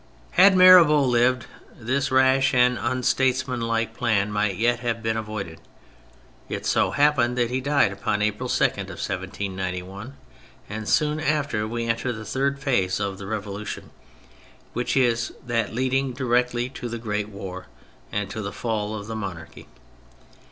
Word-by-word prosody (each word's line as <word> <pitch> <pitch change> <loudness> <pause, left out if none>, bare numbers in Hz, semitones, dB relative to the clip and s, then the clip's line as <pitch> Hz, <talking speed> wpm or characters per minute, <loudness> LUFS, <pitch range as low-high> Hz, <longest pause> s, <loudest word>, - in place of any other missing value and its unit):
Had 195 - +6
Mirabeau 175 -5 +8
lived 125 0 +2 0.3
this 130 +4 -1
rash 130 0 +3
and 125 0 +4
unstates 130 +1 +1
manlike 115 -3 -1
plan 105 -4 +1
might 105 -2 0
yet 120 +3 +1
have 115 -2 -3
been 110 0 0
avoided; 105 -7 -5 0.9
it - - -4
so - - +2
happened 140 -4 +2
that 120 -1 +1
he 130 +1 -1
died 140 -6 +2
upon 105 +1 -1
April 105 0 -2
2, - - +1
1791, 95 +5 -4 0.5
and 110 +1 -5
soon 150 0 +2
after 145 -8 0
we 115 +1 -3
enter 115 +2 -1
the 110 -2 -7
third 140 +3 -1
phase 100 -10 0
of 100 -1 -3
the 100 - -7
Revolution, 105 -1 -5 0.8
which 120 +3 -1
is 120 -2 +1
that 115 -3 -1
leading 130 +1 0
directly 125 -1 0
to 125 -2 -7
the 115 - -4
great 105 -2 -3
war, 95 -2 -8 0.4
and 105 -1 -2
to 110 - -4
the 100 -1 -4
fall 110 -2 -3
of 105 -1 -6
the 110 +1 -6
monarchy. 85 -6 -7
115 Hz, 150 wpm, -24 LUFS, 105-130 Hz, 0.9 s, Mirabeau